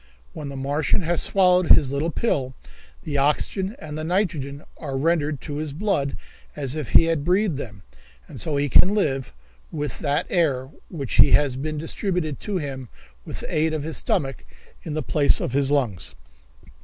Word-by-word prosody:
When 145 -2 -6
the 140 - -7
Martian 140 +7 0
has 170 +1 +2
swallowed 180 -2 +4
his 140 -3 +5
little 145 +4 0
pill, 135 - -1 0.5
the 145 -2 -1
oxygen 185 - 0
and 150 - -8
the 155 - -4
nitrogen 155 -6 -1
are 140 -3 -4
rendered 155 -1 +1
to 145 -2 -5
his 150 -2 -4
blood 155 -6 -1 0.4
as 140 -2 -3
if 150 -5 -4
he - - +8
had 165 -3 0
breathed 180 -1 +1
them, 100 -8 -8 0.4
and - - -8
so 155 - 0
he 140 0 +1
can 185 - +5
live 135 -10 0 0.4
with 150 -2 -4
that 150 +2 0
air 140 -6 +1 0.2
which 140 -7 -4
has 145 -2 +5
been 155 +3 -3
distributed 165 - -2
to 205 -3 -3
him 135 -6 -5 0.4
with - - -7
the - - -5
aid 155 +1 +2
of 150 - -3
his 160 +1 -2
stomach 135 - -1 0.4
in 150 - -5
the 155 - -1
place 145 -2 +3
of 125 - -3
his 140 0 +2
lungs." 125 -11 0
150 Hz, 180 wpm, -23 LUFS, 140-165 Hz, 0.5 s, he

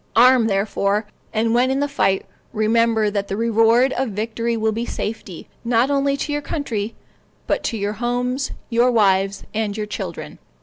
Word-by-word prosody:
Arm, 245 0 +6
therefore; 200 +1 0 0.3
and 225 +1 +1
when 245 +2 +3
in 265 +1 0
the 285 - +1
fight, 195 -9 +1 0.3
remember 220 0 +2
that 200 -1 -2
the 195 - -3
reward 230 +3 +3
of 260 -1 -1
victory 230 +3 -2
will 220 0 +1
be 225 +2 -2
safety, 210 -6 -5 0.2
not 240 +3 +2
only 280 0 +1
to 295 - -3
your 295 - -1
country, 230 -8 -3 0.5
but - - 0
to 225 - -1
your 205 0 -2
homes, 245 +4 -1 0.2
your 240 +2 +4
wives, 195 -3 +2
and 215 -1 -2
your 215 - -2
children." 210 - -6
225 Hz, 170 wpm, -21 LUFS, 210-245 Hz, 0.5 s, Arm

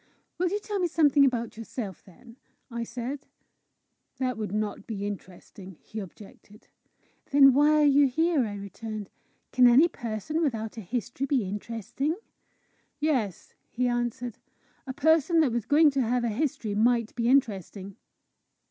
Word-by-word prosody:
"Will 360 0 +2
you 410 +3 -1
tell 415 -1 -4
me 360 - +1
something 295 -3 +4
about 235 -5 0
yourself, 225 -4 -6
then?" 230 +6 -17 0.3
I 235 0 -3
said. 250 +4 -6 0.9
"That 255 -1 -1
would 215 -3 -4
not 210 -1 -3
be 205 -3 -4
interesting!" 190 -2 -9
he 220 - -7
objected. 205 +1 -13 0.6
"Then 275 -1 +7
why 300 +3 +4
are - - +5
you 285 0 +5
here?" 310 -1 +1
I 205 - -6
returned. 205 +1 -7 0.4
"Can 250 -1 +6
any 260 +8 +6
person 240 - -4
without 225 -8 -2
a 225 - -6
history 245 +6 -3
be 265 -4 +1
interesting?" 230 - -3 0.8
"Yes," 255 - -1 0.2
he 250 +1 -1
answered: 240 -1 -2 0.5
"a 260 - -4
person 320 +3 +3
that 285 -6 +2
was 230 -2 -2
going 300 +1 +5
to 275 -1 0
have 245 +1 0
a 235 - 0
history 225 -3 -2
might 230 +1 +2
be 235 0 0
interesting." 200 - 0
240 Hz, 150 wpm, -27 LUFS, 215-280 Hz, 0.9 s, Then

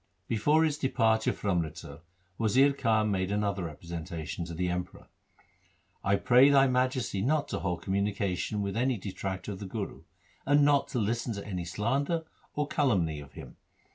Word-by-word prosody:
Before 145 +8 +3
his 150 -2 0
departure 110 -4 +2
for 100 - -2
Amritsar 80 -4 -3 0.4
Wazir 130 +6 +4
Khan 110 -5 +1
made 95 0 -1
another 100 -3 -1
representation 85 +1 -6
to 85 0 -7
the 90 +2 -1
Emperor 90 0 -5 0.3
— - - -36
' - - -40
I 100 +1 +3
pray 125 +7 +5
thy 135 -1 +6
Majesty 125 -5 0
not 145 +5 +1
to - - -2
hold 90 -2 -3
communication 100 0 -1
with 100 0 -3
any 125 +1 +1
detractor 95 0 -5
of 95 - -7
the 100 - -6
Guru, 100 +1 -5 0.4
and 145 +1 +4
not 145 -1 +3
to 130 - -4
listen 115 +2 -1
to 100 - -6
any 90 -4 -4
slander 135 - -1 0.3
or 150 - 0
calumny 95 - +1
of 70 -1 -12
him. - - -11
105 Hz, 170 wpm, -29 LUFS, 90-130 Hz, 0.4 s, thy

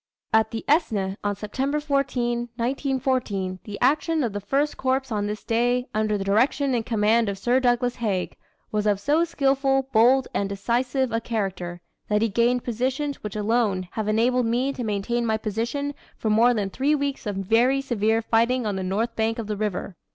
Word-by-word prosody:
At 220 0 +4
the 225 - -5
Aisne, 210 - +1
on 205 0 0
September 270 +8 -2
14, 245 -5 -1
1914, 245 -7 -1
"the 205 -2 -6
action 305 +4 +2
of 230 -4 -2
the 205 - -2
First 275 +8 0
Corps 265 +1 0
on 205 -1 -1
this 210 +1 -5
day, 245 +2 +1
under 215 -1 +1
the 195 - -3
direction 255 +7 +2
and 235 -2 0
command 225 0 +2
of 200 - -4
Sir 240 +6 +2
Douglas 245 -1 +1
Haig, 200 -6 -2 0.4
was 215 0 0
of 205 -2 +2
so 295 +10 +2
skilful, 270 -4 +1
bold, 245 +4 +5
and 200 - -1
decisive 245 +6 0
a 230 - 0
character, 190 -6 -3 0.3
that 210 +1 +2
he 225 - +2
gained 240 +4 +2
positions 260 +5 -2
which 210 -1 -6
alone 210 -4 0
have 220 -2 -3
enabled 235 +3 +2
me 250 +4 0
to 250 - -5
maintain 220 +3 -1
my 220 -1 +1
position 235 +7 -2 0.2
for 220 - -1
more 235 +3 +4
than 200 -3 -2
three 285 +7 +1
weeks 280 -5 -3
of 205 - -2
very 230 +8 +2
severe 225 -4 0
fighting 235 +2 +2
on 205 -2 -1
the - - -2
north 210 +6 -1
bank 225 0 0
of 230 - -4
the 210 0 -3
river." 205 -3 -3
230 Hz, 190 wpm, -24 LUFS, 210-260 Hz, 0.4 s, bold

